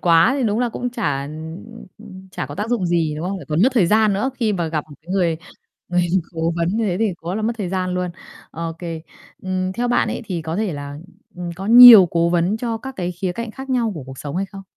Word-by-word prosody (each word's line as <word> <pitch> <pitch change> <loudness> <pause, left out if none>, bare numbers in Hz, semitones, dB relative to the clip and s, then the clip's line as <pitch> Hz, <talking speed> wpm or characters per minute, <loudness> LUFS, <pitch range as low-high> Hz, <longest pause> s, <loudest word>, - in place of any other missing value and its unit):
quá 170 +8 +4
thì - - 0
đúng 215 +1 0
là 245 -1 +1
cũng 245 +2 -4
chả, 145 - -2
ừm, 160 +2 -8
ừm, 225 0 -12
ừm, 190 -3 -13
chả - - -5
có - - -8
tác 210 +3 -4
dụng 210 -7 0
gì, 165 -3 0
đúng 160 +4 -4
không? 195 - -3
Lại - - -11
còn 155 +5 +1
mất 255 - +6
thời 220 -9 +3
gian 215 +2 +3
nữa 245 +8 -1
khi 225 -5 0
mà 175 -4 -1
gặp 155 -2 -2
một, 145 - -12
cái, 170 - -25
người 175 -4 +1 0.5
người 175 0 +1 0.3
cố 165 0 -1
vấn 170 0 0
như 220 +4 0
thế 180 -3 -1
thì 220 -5 0
quá 175 +3 -4
là 215 - -3
mất 230 +2 0
thời 195 -4 -3
gian 185 0 -2
luôn, 180 -1 -2 0.4
OK. 165 0 -6 0.6
Ừm, 185 0 -2
theo 240 +5 -2
bạn 240 - +2
ấy - - -4
thì 175 -5 -4
có 160 +2 -4
thể 210 -4 -1
là, 145 -1 -7 0.4
ừm, 175 -1 -5
có 195 +2 -6
nhiều 235 -5 +10
cố 170 0 +2
vấn 175 +4 +1
cho 230 -1 -3
các 265 +3 -8
cái 180 -1 -3
khía 180 +1 -3
cạnh 235 +4 -5
khác 265 +3 -9
nhau 235 -4 +1
của 155 - -7
cuộc 130 -1 -10
sống 145 +2 -5
hay 195 +2 -1
không? 195 0 -11
185 Hz, 270 wpm, -20 LUFS, 170-220 Hz, 0.6 s, nhiều